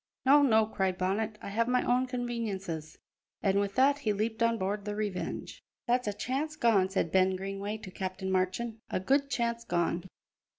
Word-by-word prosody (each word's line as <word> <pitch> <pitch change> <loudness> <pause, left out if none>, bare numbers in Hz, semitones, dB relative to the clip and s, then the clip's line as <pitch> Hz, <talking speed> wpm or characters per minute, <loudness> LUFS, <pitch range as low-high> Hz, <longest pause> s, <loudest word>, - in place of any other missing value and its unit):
"No, 285 +2 +7
no," 220 -6 +5
cried 190 -3 -1
Bonnet, 210 +4 -1
"I - - -5
have 230 +3 +1
my 250 0 +2
own 250 +1 +2
conveniences." 210 - -4 0.5
And 195 0 +3
with 200 -1 -1
that 275 +2 +4
he 220 -7 0
leaped 220 +3 -2
on 230 0 +3
board 200 +1 -2
the 205 0 -4
Revenge. 205 -4 -4 0.2
"That's 245 -1 +1
a 205 - 0
chance 275 +9 -2
gone," 215 -9 +3
said 190 -4 0
Ben 190 0 +3
Greenway 195 +2 -4
to 205 -3 -10
Captain 190 0 -4
Marchand, 190 +5 -1
"a - - -1
good 275 +8 +2
chance 235 -2 -1
gone. 175 -2 0
210 Hz, 180 wpm, -30 LUFS, 190-240 Hz, 0.5 s, No